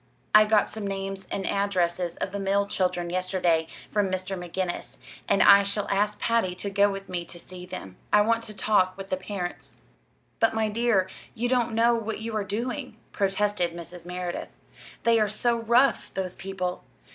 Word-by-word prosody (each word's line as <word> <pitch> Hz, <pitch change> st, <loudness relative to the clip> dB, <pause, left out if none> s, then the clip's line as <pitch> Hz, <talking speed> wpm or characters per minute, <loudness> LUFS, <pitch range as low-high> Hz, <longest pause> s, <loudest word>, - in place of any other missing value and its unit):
"I 215 Hz, 0 st, +8 dB
got 210 Hz, -1 st, +3 dB
some 215 Hz, -2 st, -5 dB
names 195 Hz, -1 st, -4 dB
and 195 Hz, -, -3 dB
addresses 180 Hz, -3 st, 0 dB
of -, -, -3 dB
the 200 Hz, -, -4 dB
mill 200 Hz, +1 st, +1 dB
children 180 Hz, -3 st, -1 dB
yesterday 180 Hz, -3 st, +1 dB, 0.2 s
from 205 Hz, -2 st, +1 dB
Mr. 185 Hz, +1 st, -2 dB
McGinnis; 180 Hz, 0 st, -4 dB, 0.3 s
and 200 Hz, -, +4 dB
I 200 Hz, 0 st, +9 dB
shall 200 Hz, +1 st, -1 dB
ask 205 Hz, +1 st, +1 dB
Patty 230 Hz, -6 st, +1 dB
to 200 Hz, +2 st, -4 dB
go 200 Hz, +1 st, +4 dB
with 195 Hz, 0 st, -6 dB
me 180 Hz, -2 st, -3 dB
to 175 Hz, -, -10 dB
see 180 Hz, +1 st, -10 dB
them. 95 Hz, -, -8 dB
I 210 Hz, -, +6 dB
want 230 Hz, +2 st, +2 dB
to 215 Hz, -, -9 dB
talk 185 Hz, -3 st, +2 dB
with 195 Hz, 0 st, -8 dB
the -, -, +1 dB
parents." 185 Hz, -2 st, -6 dB, 0.6 s
"But, 225 Hz, -1 st, +3 dB
my 220 Hz, -1 st, +1 dB
dear, 215 Hz, -4 st, +2 dB, 0.3 s
you 240 Hz, +1 st, 0 dB
don't 240 Hz, -2 st, +1 dB
know 230 Hz, +1 st, +4 dB
what 225 Hz, -1 st, -2 dB
you 220 Hz, 0 st, -5 dB
are 215 Hz, -, 0 dB
doing," 230 Hz, +5 st, -4 dB
protested 195 Hz, -3 st, 0 dB
Mrs. 175 Hz, +1 st, -9 dB
Merideth. 180 Hz, -1 st, -4 dB, 0.5 s
"They 230 Hz, -1 st, +4 dB
are 210 Hz, -1 st, +2 dB
so 235 Hz, +3 st, +1 dB
rough 240 Hz, +4 st, +3 dB
those 185 Hz, -2 st, -2 dB
people. 185 Hz, -1 st, -4 dB
195 Hz, 180 wpm, -26 LUFS, 185-215 Hz, 0.6 s, I